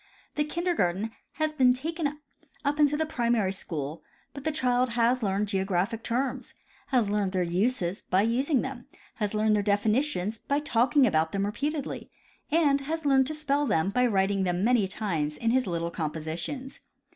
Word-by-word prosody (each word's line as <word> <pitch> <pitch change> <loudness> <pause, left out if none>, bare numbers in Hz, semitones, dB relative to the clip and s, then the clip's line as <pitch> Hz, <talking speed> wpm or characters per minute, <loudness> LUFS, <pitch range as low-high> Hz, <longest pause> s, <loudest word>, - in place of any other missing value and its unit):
The 300 - +1
kindergarten 260 - -1 0.2
has 310 +1 -1
been 255 -4 +5
taken 300 +2 -3 0.5
up 290 +1 0
into 295 0 +4
the 315 - +1
primary 235 -9 +1
school; 155 -5 -4 0.3
but 280 0 -8
the 315 - +2
child 250 -4 +1
has 240 +2 +3
learned 200 0 0
geographic 195 +2 -1
terms, 250 +2 -2 0.3
has 240 -7 +1
learned 205 -2 0
their 185 -1 +1
uses 185 +1 0
by 190 +2 +1
using 255 +5 +2
them, 265 -2 -6 0.3
has 210 -1 -2
learned 215 0 +3
their 205 - +2
definitions 210 +1 +1
by 285 -1 -1
talking 265 -1 +3
about 160 -6 +1
them 200 0 0
repeatedly, 280 +7 -3 0.4
and 295 -3 +3
has 320 +3 -4
learned 265 -2 +4
to 310 - -2
spell 290 -1 0
them 175 -2 +1
by 250 +3 +3
writing 195 -2 +1
them 180 0 0
many 230 -3 +3
times 165 -7 -2
in 230 +6 0
his 255 -2 +2
little 170 -1 -2
compositions. 165 - -4
230 Hz, 170 wpm, -27 LUFS, 195-280 Hz, 0.5 s, been